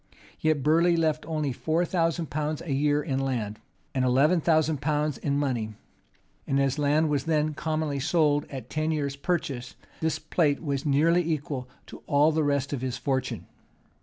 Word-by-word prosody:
Yet 155 -3 +1
Burleigh 170 +3 +4
left 155 -2 0
only 155 -4 -1
four 160 +7 0
thousand 165 -2 0
pounds 150 +1 -2
a 155 - -2
year 145 +1 +2
in 135 -4 -1
land, 120 -6 -2 0.3
and 130 - +1
eleven 140 +7 +3
thousand 160 -3 +2
pounds 150 0 0
in 140 -1 0
money; 120 -7 -1 0.7
and 135 - +1
as 135 +1 +1
land 150 +2 +3
was 145 -3 0
then 155 -1 +1
commonly 155 -2 -2
sold 150 0 +2
at 130 -4 -7
ten 155 +1 -1
years' 145 -3 -1
purchase, 140 -5 -3 0.2
his 160 0 0
plate 155 -1 0
was 140 -1 -2
nearly 160 +5 +4
equal 145 -5 -3 0.2
to - - -11
all 145 +2 +4
the 160 0 +1
rest 140 -1 0
of 135 - -3
his 130 -2 -2
fortune. 130 0 -2
150 Hz, 170 wpm, -27 LUFS, 135-155 Hz, 0.7 s, Burleigh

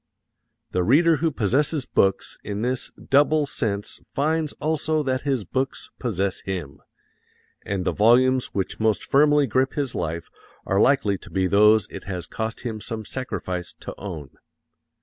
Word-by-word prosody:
The 90 - +1
reader 155 - +4
who 165 +3 +1
possesses 135 - 0
books 95 0 +1
in 105 +1 -4
this 125 +1 -1 0.2
double 145 +2 +4
sense 105 -6 -3 0.2
finds 155 +1 +1
also 155 0 0
that 130 -2 -1
his 130 -7 0
books 130 +7 -3
possess 100 -6 -1
him, 85 -7 -5 0.8
and 95 -2 -3
the - - +2
volumes 125 +4 +4
which 95 -2 -3
most 110 -2 +1
firmly 145 +1 +4
grip 130 +2 +1
his 140 -4 -1
life 85 0 -3 0.4
are 95 +1 +2
likely 105 -8 +3
to - - -13
be 95 -1 0
those 105 +2 +5
it - - -8
has 90 -2 -4
cost 110 0 -4
him 110 -3 -4
some 110 -1 -5
sacrifice 90 -9 -4
to - - -6
own. 80 -9 -7
115 Hz, 150 wpm, -24 LUFS, 100-140 Hz, 0.8 s, those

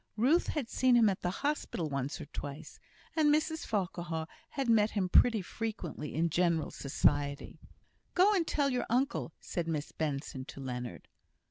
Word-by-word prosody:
Ruth 275 +10 +3
had 295 -7 -2
seen 255 +1 +3
him 225 -3 +6
at 190 - -2
the 180 - 0 0.2
hospital 290 - -1
once 140 +2 -3
or 155 - -6
twice, 145 +1 -8 0.4
and 305 -2 +4
Mrs 310 +1 0
Farquhar 175 -5 -2 0.2
had 275 -3 -2
met 220 -2 +4
him 195 -4 0
pretty 225 0 +5
frequently 180 -9 -5
in 165 +1 +1
general 170 -2 +1
society. 140 0 0 0.6
"Go 385 +4 +6
and 345 -5 +1
tell 280 -2 +1
your 250 -1 -1
uncle," 255 - 0
said 170 -2 -3
Miss 155 -2 -2
Benson 140 -3 -3
to - - -10
Leonard. 125 -8 -5
180 Hz, 160 wpm, -32 LUFS, 150-250 Hz, 0.6 s, him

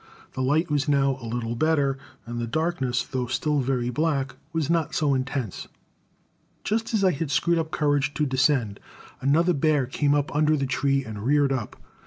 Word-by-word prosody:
The 130 - -3
light 150 +5 +1
was 145 +1 +1
now 135 -2 +2
a 115 - -6
little 115 0 -3
better, 145 -1 +2 0.3
and 120 0 -5
the 120 - -2
darkness, 135 -4 -1
though 130 -3 -3
still 145 +4 0
very 125 -2 0
black, 140 -1 -1 0.2
was 160 -3 -1
not 165 -2 0
so 150 -3 +2
intense. 130 -5 -3 1.0
Just 225 +1 -1
as 205 - +1
I 190 - +5
had 160 -1 -3
screwed 170 +5 +2
up 160 -1 -2
courage 145 -3 0
to 150 - +1
descend, 130 -6 +1 0.4
another 165 +6 +3
bear 150 -2 +2
came 145 +3 +1
up 145 0 -1
under 155 +1 +3
the 140 - -1
tree 135 +1 0
and 110 -3 -7
reared 140 +3 +2
up. 130 -3 -3
140 Hz, 185 wpm, -25 LUFS, 130-155 Hz, 1.0 s, I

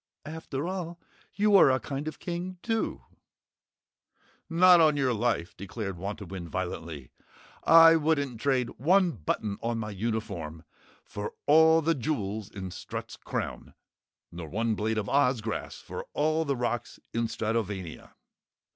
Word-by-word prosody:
"After 155 -1 -5
all 175 -2 -4 0.4
you 210 0 +4
are 180 - +8
a 130 0 +3
kind 140 +5 -5
of 155 - -5
King, 180 +1 -5
too!" 225 -1 -1 1.5
"Not 175 +1 +7
on 155 -2 +4
your 130 -3 +2
life!" 110 -6 -1
declared 100 0 -5
Wantowin 95 -2 -6
violently. 85 -6 -5 0.5
"I 165 0 +8
wouldn't 145 -7 0
trade 130 -4 +1
one 180 +6 +4
button 100 - -3
on 115 0 -1
my 110 -1 -4
uniform 100 -7 -4 0.4
for 105 0 -6
all 160 +2 +6
the 165 +2 +3
jewels 110 -7 -3
in 95 -4 -7
Strut's - - -7
crown, - - -5 0.6
nor 85 -2 -7
one 115 +4 0
blade 110 +1 -1
of 105 -1 -1
Oz 135 -2 +3
grass 110 0 -4
for - - -7
all 155 +2 +1
the 140 -2 0
rocks 120 -1 -3
in 115 0 0
Stratovania!" 105 -7 -3
120 Hz, 140 wpm, -28 LUFS, 100-160 Hz, 1.5 s, are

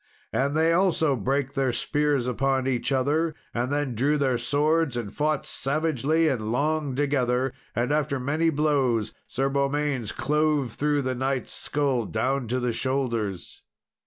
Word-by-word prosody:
And 140 +3 +1
they 165 +1 +4
also 165 -5 +2
brake 135 +4 -1
their 135 -2 +1
spears 145 +1 0
upon 130 +2 0
each 130 0 -1
other, 150 +4 +1 0.2
and 120 +3 -1
then 145 -3 0
drew 140 +7 +1
their 130 -4 +1
swords, 145 +1 +1
and 105 -4 -4
fought 150 -1 0
savagely 155 +2 0
and 110 -7 -1
long 150 +1 0
together. 130 -2 +1 0.2
And 120 +4 0
after 150 -2 0
many 150 +6 +1
blows, 135 -8 +1
Sir 135 +2 -1
Beaumains 140 -3 0
clove 150 -4 0
through 145 -1 0
the 130 0 -1
knight's 130 +1 -2
skull 135 -6 0
down 130 +3 -1
to 125 +3 0
the 125 -1 -1
shoulders. 115 -7 -2
135 Hz, 150 wpm, -26 LUFS, 125-150 Hz, 0.2 s, they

